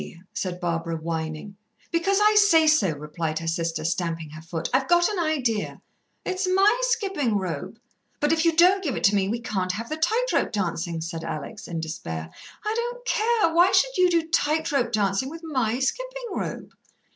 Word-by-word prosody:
said 180 -2 -3
Barbara, 165 -2 -2
whining. 160 +3 -4 0.4
"Because 365 +4 +1
I 425 +1 +5
say 410 -7 +6
so," 305 - +4
replied 155 +1 -4
her 165 - -4
sister, 165 -1 -2
stamping 165 -2 -2
her 155 0 -9
foot. 165 0 -4
"I've 265 +1 +2
got 345 0 +4
an 415 -4 -2
idea." 265 -10 -1 0.5
"It's 370 +1 -1
my 390 +4 +4
skipping 390 - 0
rope." 185 -4 -4 0.4
"But 295 +2 +2
if 320 0 +1
you 335 -1 +3
don't 370 +3 +5
give 285 -8 -1
it - - -5
to 205 +1 +5
me 195 -1 +1
we 230 +2 -1
can't 190 -5 -2
have 230 +4 -5
the 310 - -3
tight 440 +10 +1
rope - - +1
dancing," 170 -4 -2
said 165 0 -5
Alex 165 +7 -6
in 165 -1 -4
despair. 80 - -5 0.3
"I 425 - 0
don't 485 +1 -3
care. 445 -6 +2
Why 350 +3 +5
should - - +3
you 365 0 +4
do 335 -2 +1
tight 315 0 +1
rope 250 -4 +1
dancing 205 +3 0
with 330 +2 -9
my 255 -8 0
skipping - - -3
rope?" - - -5
250 Hz, 190 wpm, -25 LUFS, -, 0.5 s, say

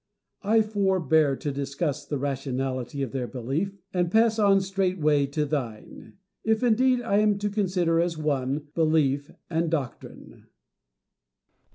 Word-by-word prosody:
I 220 +2 +3
forbear 185 -8 +2
to 145 - -4
discuss 140 +2 -3
the 145 - -2
rationality 135 -1 -3
of 130 - -4
their 130 -3 -3
belief, 140 +12 -3 0.2
and 175 -2 +1
pass 225 +2 +3
on 200 -2 +5
straight 190 -1 -1
way 150 -2 +3
to 150 +2 -1
thine; 130 -8 -5 0.3
if, 220 +1 +1
indeed, 250 +1 +3
I 205 -3 +2
am 210 -1 +3
to 205 0 -2
consider 180 -5 +1
as 170 -1 0
one, 145 -1 -2
belief 150 -3 +1 0.2
and 165 0 0
doctrine. 145 -7 -6
160 Hz, 140 wpm, -26 LUFS, 140-195 Hz, 0.3 s, on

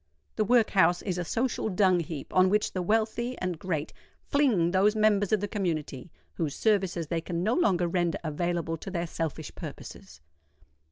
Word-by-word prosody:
The 215 - +1
workhouse 200 -6 +3
is 180 -3 -2
a - - -1
social 230 +4 -1
dung 185 -2 +3
heap 160 -3 -6
on 185 0 +5
which 210 +2 +1
the 185 - -2
wealthy 225 +5 0
and 180 -3 -3
great 160 -4 -3 0.3
fling 230 - +2
those 200 +3 +3
members 210 -2 +2
of 215 -2 +2
the 205 - -1
community 165 - -3 0.2
whose 155 -4 -3
services 190 -6 +1
they 165 +2 -2
can 170 0 -3
no 220 +4 +2
longer 185 - +2
render 175 -1 0
available 165 +1 -2
to 175 - -8
their 175 -2 -2
selfish 165 -2 -4
purposes. 75 - -10
185 Hz, 170 wpm, -28 LUFS, 170-210 Hz, 0.3 s, on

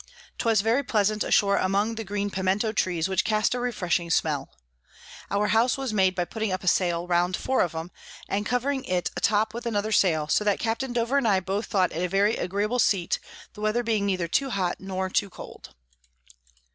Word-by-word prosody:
'Twas 225 -4 +2
very 225 +6 +2
pleasant 215 -4 +1
ashore 200 -1 +3
among 200 +4 +1
the 225 0 -5
green 205 0 -3
Piemento 190 +4 0
Trees, 180 -5 0
which 190 0 +1
cast 215 +1 +1
a 250 - -2
refreshing 185 -8 -1
Smell. 155 -3 0 0.8
Our 205 +2 0
House 230 +4 +3
was 265 -4 -3
made 190 -2 +2
by 175 -1 0
putting 220 +3 -3
up 185 0 -3
a - - -7
Sail 175 -2 +2
round 175 0 +1
four 260 0 0
of 170 -2 -1
'em, 165 +2 -5 0.4
and 200 +1 -1
covering 260 +4 -1
it 180 -1 -1
a - - -4
top 215 +1 +2
with 235 +1 -5
another 215 -1 -1
Sail; 160 -7 +2
so 210 - +2
that 205 -1 +2
Capt. 230 +3 -2
Dover 240 +3 +1
and 235 - 0
I 195 -3 +3
both 195 +4 -3
thought 185 -4 +1
it 170 - -3
a 180 - -1
very 200 +4 +2
agreeable 205 +6 -1
Seat, 185 -7 +1 0.3
the 210 - -11
Weather 215 +3 +1
being 215 -3 0
neither 185 -3 0
too 270 +10 0
hot 185 -6 -1
nor 190 -1 -3
too 200 +1 0
cold. 65 - -12
200 Hz, 205 wpm, -26 LUFS, 185-225 Hz, 0.8 s, ashore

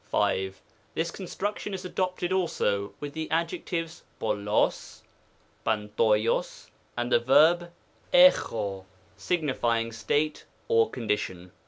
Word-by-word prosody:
5. 95 0 0 0.4
This 165 +1 -1
construction 200 +2 -4
is 185 - -7
adopted 185 0 -1
also 105 - 0
with 145 -1 -6
the 160 0 -4
ad 165 +1 +1
jectives 165 -2 -4 0.2
.ToPcAo^, 105 -1 0 0.6
TiavToloZy 110 +1 0 0.3
and 120 +1 -2
the - - +5
verb 165 +8 +4 0.4
tx(Oj 110 - +4 0.3
signifying 120 -9 0
state 145 +7 -1 0.2
or 115 -1 +3
condition. 105 -6 -3
120 Hz, 105 wpm, -27 LUFS, 105-170 Hz, 0.6 s, the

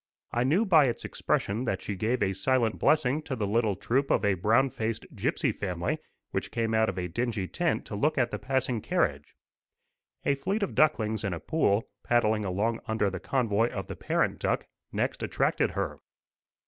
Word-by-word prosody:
I 120 - +1
knew 165 - +3
by 160 -7 +6
its 120 - -3
expression 110 +6 -1
that 95 -5 -2
she 105 - -3
gave 110 +4 0
a 95 -1 +1
silent 115 +2 +1
blessing 150 -1 +3
to 140 -3 -4
the 110 -4 -1
little 105 0 +1
troop 130 +7 0
of 100 - +2
a 100 - +4
brown 115 +9 +3
faced 110 0 -3
gipsy - - 0
family, 90 -3 -2 0.3
which - - -2
came 115 -1 -1
out 110 0 +3
of 95 - -4
a 90 -1 -2
dingy 110 +1 -2
tent 175 - -1
to 105 - -6
look 150 +9 +1
at 120 -3 +2
the - - -3
passing 130 -3 0
carriage. - - -1 0.9
A 140 - +4
fleet 190 +10 -1
of 200 - -2
ducklings 110 -9 +2
in 100 -3 -1
a - - -6
pool, 115 - +1 0.2
paddling 110 -3 +2
along 105 +5 0
under 110 -3 +1
the 95 - -4
convoy 115 -3 +1
of 95 -5 -5
the - - -7
parent - - 0
duck, - - 0 0.3
next - - -1
attracted - - +1
her. - - -2
115 Hz, 190 wpm, -28 LUFS, 100-130 Hz, 0.9 s, by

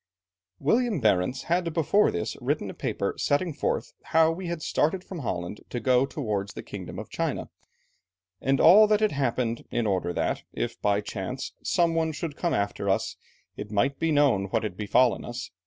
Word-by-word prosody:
"William 225 - +1
Barentz 105 +1 +1
had 170 0 0
before 175 +6 +3
this 85 - -3
written - - -1
a - - -10
paper - - -2
setting 155 +4 +1
forth - - -2
how 160 0 +4
we 180 +2 -5
had 170 -2 -4
started 180 +5 +1
from 185 -3 -7
Holland 90 - -4
to 120 - -3
go 125 +3 +3
towards 105 -9 -3
the - - -6
kingdom - - -8
of - - -7
China, - - -2 0.9
and 135 +1 +2
all 210 +6 +8
that 210 0 +3
had 215 - +3
happened, 120 -4 -1
in 120 -1 -1
order 95 -4 0
that, - - -1
if - - -4
by 100 0 +2
chance, 105 +6 -5
some 170 -2 +2
one 160 -1 0
should 150 -1 -4
come 170 +1 0
after 100 0 -1
us, 95 - 0 0.4
it 105 - -7
might 120 +7 0
be 165 - +1
known 140 -10 +3
what 105 +3 -1
had 105 -5 -3
befallen 110 +4 +2
us. 120 0 -6
135 Hz, 185 wpm, -27 LUFS, 105-165 Hz, 0.9 s, all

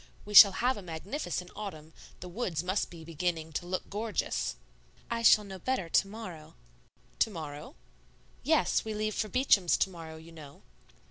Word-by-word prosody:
We 210 - -8
shall 200 -1 +11
have 250 +4 0
a - - -7
magnificent 180 - -5
autumn; 160 -7 -8 0.3
the 180 - -7
woods 180 -4 -3
must 185 +3 -1
be 165 -2 -11
beginning 165 0 -3
to 175 - -4
look 185 +1 -3
gorgeous." 215 -1 -2 0.6
"I 230 0 -1
shall 215 -2 +6
know 190 -2 -9
better 225 -5 -2
to 195 - +3
morrow." 190 - -9 0.6
"To - - +3
morrow?" 150 -6 -8 0.7
"Yes; - - +2
we 220 -1 -4
leave 215 0 -1
for 215 - -1
Beacham's 205 -8 +3
to 190 - +1
morrow, 165 -2 -9
you 160 +1 -13
know." 150 -4 -13
185 Hz, 165 wpm, -30 LUFS, 165-215 Hz, 0.7 s, shall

